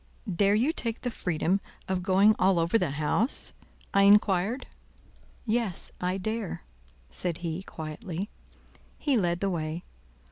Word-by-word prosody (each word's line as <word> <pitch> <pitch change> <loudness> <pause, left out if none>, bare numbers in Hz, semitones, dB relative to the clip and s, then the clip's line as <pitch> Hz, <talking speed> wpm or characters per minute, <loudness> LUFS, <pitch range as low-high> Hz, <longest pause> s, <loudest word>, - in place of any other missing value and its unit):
"Dare 200 +3 +4
you 255 +9 +2
take 230 -7 -3
the 245 - -2
freedom 180 0 0 0.3
of 185 -1 0
going 195 +4 +5
all 190 -1 +4
over 165 +4 +1
the 180 - 0
house?" 155 - +1 0.4
I 200 - +5
inquired. 200 +3 +4 0.8
"Yes, 220 -5 -1
I 180 +1 0
dare," 215 0 -3 0.4
said 175 - -1
he, 165 +2 -2
quietly. 175 +3 -6 0.7
He 285 -3 +1
led 175 -5 +1
the 195 -1 +1
way. 160 0 -3
190 Hz, 135 wpm, -28 LUFS, 170-215 Hz, 0.8 s, going